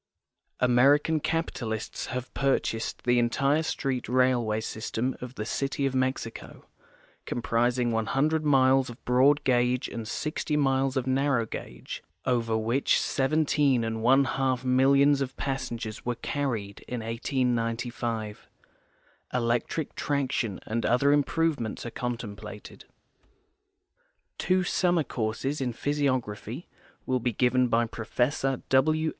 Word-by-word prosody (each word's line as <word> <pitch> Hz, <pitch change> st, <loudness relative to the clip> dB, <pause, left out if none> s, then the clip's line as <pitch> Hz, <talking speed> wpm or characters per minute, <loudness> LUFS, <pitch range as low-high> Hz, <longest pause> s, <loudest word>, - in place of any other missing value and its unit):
American 140 Hz, +6 st, +4 dB
capitalists 120 Hz, -9 st, -3 dB
have 125 Hz, 0 st, -5 dB
purchased 120 Hz, -3 st, -1 dB
the 120 Hz, 0 st, +3 dB
entire 140 Hz, +6 st, +2 dB
street 135 Hz, -6 st, -2 dB
railway 125 Hz, -4 st, +2 dB
system 110 Hz, +3 st, -3 dB
of 125 Hz, +1 st, -7 dB
the 105 Hz, -, -4 dB
city 140 Hz, +4 st, -1 dB
of 135 Hz, -, 0 dB
^Mexico, 130 Hz, -3 st, -3 dB, 0.6 s
comprising 120 Hz, +1 st, +1 dB
100 135 Hz, +8 st, +1 dB
miles 135 Hz, -2 st, +4 dB
of 120 Hz, -, -12 dB
broad 135 Hz, +4 st, +4 dB
gauge 125 Hz, 0 st, +2 dB
and 115 Hz, -2 st, -6 dB
60 150 Hz, +3 st, -2 dB
miles 135 Hz, -1 st, +1 dB
of 130 Hz, -, 0 dB
narrow 130 Hz, -2 st, +1 dB
gauge, -, -, -7 dB, 0.2 s
over 115 Hz, -3 st, +1 dB
which 115 Hz, +5 st, +2 dB
seventeen 140 Hz, -2 st, +2 dB
and 110 Hz, 0 st, -3 dB
one 135 Hz, +4 st, +5 dB
half 130 Hz, -1 st, -1 dB
millions 140 Hz, +2 st, +4 dB
of 135 Hz, -1 st, -4 dB
passen 130 Hz, -3 st, -3 dB
gers 110 Hz, -1 st, -6 dB
were 120 Hz, 0 st, -1 dB
carried 115 Hz, -6 st, -3 dB
in 125 Hz, -2 st, -4 dB
1895. 115 Hz, -2 st, -2 dB, 0.8 s
Electric 120 Hz, +5 st, -1 dB
traction 130 Hz, -7 st, -1 dB
and 115 Hz, +1 st, -2 dB
other 125 Hz, +5 st, +3 dB
improvements 145 Hz, -5 st, 0 dB
are 120 Hz, -, -5 dB
contemplated. 105 Hz, -4 st, -6 dB, 1.5 s
Two 185 Hz, 0 st, +2 dB
summer 175 Hz, -2 st, +2 dB
courses 125 Hz, +4 st, -2 dB
in 125 Hz, -2 st, 0 dB
physiography 130 Hz, -, -2 dB, 0.4 s
will 130 Hz, -1 st, +1 dB
be 120 Hz, 0 st, -1 dB
given 125 Hz, +2 st, +3 dB
by 115 Hz, 0 st, +2 dB
Professor 125 Hz, +4 st, -1 dB
W. 155 Hz, +4 st, +3 dB
125 Hz, 120 wpm, -27 LUFS, 115-140 Hz, 1.5 s, one